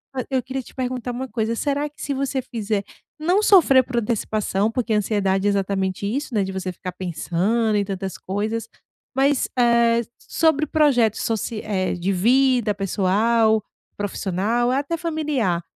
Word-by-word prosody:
fa 255 - -1
eu 260 -2 0
queria 265 +1 -4
te - - -16
perguntar 250 -1 -3
uma 255 +2 -4
coisa: 225 -1 -2
será 285 +3 -1
que 295 - -28
se 280 - -2
você 270 0 -1
fizer, 215 -4 -2 0.4
não 355 +6 +2
sofrer 330 -11 +6
por 250 -1 -4
antecipação, 215 -2 0
porque 230 -2 -1
ansiedade 200 -2 +1
é - - +4
exatamente 195 -1 -1
isso 245 +3 -3
né, 200 - +2
de 190 - -4
você 190 -1 -4
ficar 185 +1 -7
pensando 185 +5 -1
em 205 - +2
tantas 195 -1 -4
coisas, 215 +4 -3 0.5
mas, 275 0 +2
eh, 235 -1 +4 0.2
sobre 310 -2 +1
projetos 250 -9 +3
soci 225 -1 -2
eh, 190 -4 -1
de 180 +3 -1
vida 245 +2 +3
pessoal, 215 +3 +2 0.3
profissional 205 +4 -1
e - - +1
até 285 +5 -1
familiar, 295 - -1
225 Hz, 160 wpm, -22 LUFS, 200-260 Hz, 0.5 s, sofrer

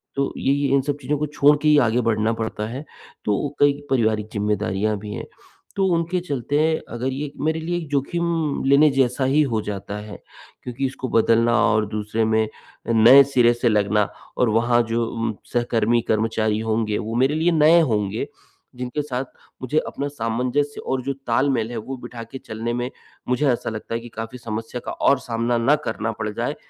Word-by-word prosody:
तो 140 0 -1
ये 135 - +1
ये 140 0 +1
इन 135 - +3
सब 140 +1 -2
चीज़ों 145 +3 -1
को 150 - -1
छोड़ 145 0 +4
के 155 - +1
ही 150 -1 +6
आगे 115 +3 +1
बढ़ना 110 -1 +1
पड़ता 110 -1 -3
है। 130 +5 -6 0.4
तो 105 +7 0
कई 145 0 +5 0.2
पारिवारिक 110 -4 +1
ज़िम्मेदारियाँ 105 0 0
भी 105 +1 -7
हैं, - - -5 0.5
तो 195 - +2
उनके 170 +2 0
चलते 150 0 0
अगर 125 +3 -3
ये 140 +1 -4
मेरे 160 +1 0
लिए 175 +2 -2
एक 165 -2 -5
जोखिम 160 +2 -1
लेने 140 +3 +6
जैसा 135 0 +1
ही 140 +4 +3
हो 110 - +1
जाता 100 0 -5
है। 105 0 -9 0.5
क्योंकि 125 +2 -3
इसको 130 -1 -4
बदलना 115 +1 +3
और 110 -1 +2
दूसरे 105 +1 -1
में 110 0 +2 0.4
नए 115 +4 +8
सिरे 125 -3 +3
से 120 0 +1
लगना 105 -1 +2 0.3
और 125 - +3
वहाँ 120 +2 +3
जो 115 0 0 0.2
म 110 - -1 0.2
सहकर्मी 120 -1 +2
कर्मचारी 110 -1 +1
होंगे 110 -1 0
वो 110 +2 -4
मेरे 135 +5 +2
लिए 165 +2 +2
नए 160 +1 +6
होंगे, 105 -7 -1 0.5
जिनके 125 +4 -3
साथ 130 -2 -3 0.4
मुझे 140 +5 +1
अपना 140 - -3
सामंजस्य 125 +2 -2
और 130 -1 0
जो 140 - -2
तालमेल 120 -1 +1
है 120 - -4
वो 130 +5 -5
बिठा 120 -1 -8
के 115 +4 -9
चलने 115 +1 -4
में 120 +1 -2 0.4
मुझे 125 +4 +1
ऐसा 120 -1 0
लगता 110 +1 -6
है - - -1
कि 120 - -10
काफ़ी 115 +3 -6
समस्या 115 0 -5
का - - -3
और 140 - +2
सामना 120 -1 -1
ना 125 +6 +4
करना 115 +1 -2
पड़ 110 - -2
जाए। - - -2
120 Hz, 190 wpm, -22 LUFS, 110-140 Hz, 0.5 s, नए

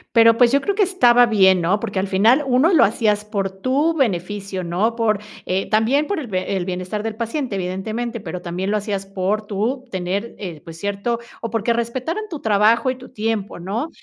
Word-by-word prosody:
Pero, 230 0 +6
pues, 240 -1 +5
yo 280 +1 +3
creo 400 - 0
que 410 +1 +3
estaba 245 -11 +5
bien, 190 -5 +4
¿no? 185 +5 +1
Porque 205 -3 -3
al 190 - -1
final 220 +9 +4
1, 265 +8 +3
lo 325 - +6
hacías 210 0 +1
por 200 -2 -2
tu 260 +11 0
beneficio, 195 - -2
¿no? 190 +7 0
Por, 220 -3 +1 0.3
eh 190 +1 -1
también 240 +8 +2
por 405 - -1
el 280 - -6
b 185 -1 -2
el 185 -2 -2
bienestar 185 +3 -4
del 225 -1 -3
paciente, 235 +1 -3
evidentemente, 215 +6 -3
pero 180 -2 -6
también 180 +3 -3
lo 215 - +2
hacías 200 -2 -3
por 195 +2 -2
tú 225 +6 -2
tener, 190 +5 -3
eh, 175 -7 -7
pues 165 -2 -11
cierto, 205 +4 -2 0.2
o 230 - -3
porque 225 +1 +1
respetaran 255 - -2
tu 315 - -5
trabajo 220 +3 +3
y 255 - -1
tu 255 0 -13
tiempo, 220 -5 -3
¿no? 210 - -3
215 Hz, 205 wpm, -21 LUFS, 195-240 Hz, 0.3 s, Pero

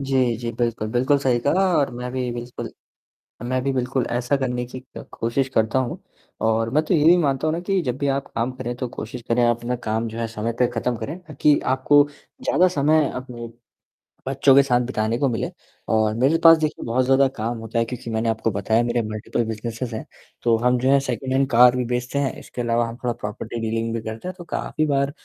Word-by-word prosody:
जी, 130 -3 +1
जी, 120 +1 -4
बिल्कुल, 115 -3 -1
बिल्कुल 130 +5 +2
सही 130 -3 +1
कहा 190 +6 +3
और 140 -3 +2
मैं 125 +1 -5
भी 125 -2 -2
बिल्कुल 120 +1 -6 0.8
मैं 130 +1 0
भी 135 - +1
बिल्कुल 125 0 -1
ऐसा 120 +3 0
करने 125 -2 -2
की 130 +1 -8 0.2
क - - -7
कोशिश 130 +4 -1
करता 110 +4 +2
हूँ 125 -2 -3 0.5
और 115 0 +1
मैं 155 - +3
तो 185 - +1
ये 155 -2 +3
भी 175 +2 +8
मानता 140 -2 +1
हूँ 155 - +1
ना - - -2
कि 195 -2 +2
जब 125 -3 -2
भी 140 0 -1
आप 140 - -16
काम 120 +3 0
करें 125 -1 -5
तो 125 0 -3
कोशिश 120 +3 -6
करें 120 +1 +3
आप 120 -1 +3
अपना 120 +1 -3
काम 110 +1 -1
जो 110 +1 -7
है 115 - -1
समय 115 +1 -3
पे 125 - +4
ख़त्म 120 +1 0
करें 155 +9 -5
ताकि 150 -4 +2
आपको 140 +2 +4 0.4
ज़्यादा 185 +1 +4
समय 155 -2 +2
अपने 120 -2 -7 0.8
बच्चों 135 0 +4
के 140 - +8
साथ 125 -2 +2
बिताने 115 -2 -1
को 140 - +2
मिले 115 - -2 0.4
और 110 -1 +2
मेरे 135 +7 +3
पास 165 0 +9
देखिए 155 -1 -2
बहुत 125 +2 +1
ज़्यादा 135 +1 +4
काम 115 +2 -2
होता 115 +1 -3
है 115 - +2
क्योंकि 120 -1 -7
मैंने 110 +1 0
आपको 110 0 0
बताया 110 +4 +1
मेरे 120 0 0
मल्टीपल 110 +2 -2
बिज़नेसेस 115 +2 -4
हैं, 110 - -5 0.4
तो 115 -1 +4
हम 125 +2 +2
जो 130 - +1
है 140 0 +5
सेकंड 130 0 -3
हैंड 135 0 +2
कार 125 +1 +6
भी 125 - 0
बेचते 125 +3 -2
हैं 140 -2 0
इसके 125 - -7
अलावा 115 0 +1
हम 115 - -7
थोड़ा 120 -1 0
प्रॉपर्टी 110 +2 -6
डीलिंग 115 +1 -2
भी 115 - -3
करते 110 +9 -6
हैं 185 - -4
तो 175 - -8
काफ़ी 155 -1 -2
बार 140 0 +1
125 Hz, 230 wpm, -22 LUFS, 115-135 Hz, 0.8 s, पास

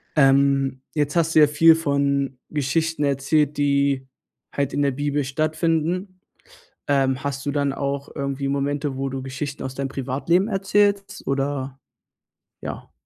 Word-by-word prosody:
Ähm, 135 -2 +3
jetzt 145 -1 0
hast 165 -1 +1
du - - +8
ja 150 - +7
viel 160 +2 +6
von 140 -3 0
Geschichten 155 +2 -1
erzählt, 145 +1 +1
die 140 -2 +1 0.5
halt 140 -1 -1
in 145 - 0
der 140 - +2
Bibel 145 +2 -1
stattfinden. 165 +6 -1 0.7
Ähm, 135 -1 +1
hast 140 0 -3
du - - +1
dann 140 -1 0
auch 140 0 -3
irgendwie 140 -1 -3
Momente, 140 0 -1
wo 135 +1 -2
du 135 0 -4
Geschichten 135 +2 -5
aus 130 - -5
deinem 135 0 -3
Privatleben 140 +8 0
erzählst 200 0 +1
oder 135 -1 -2 0.8
ja. - - -7
140 Hz, 140 wpm, -23 LUFS, 135-155 Hz, 0.8 s, du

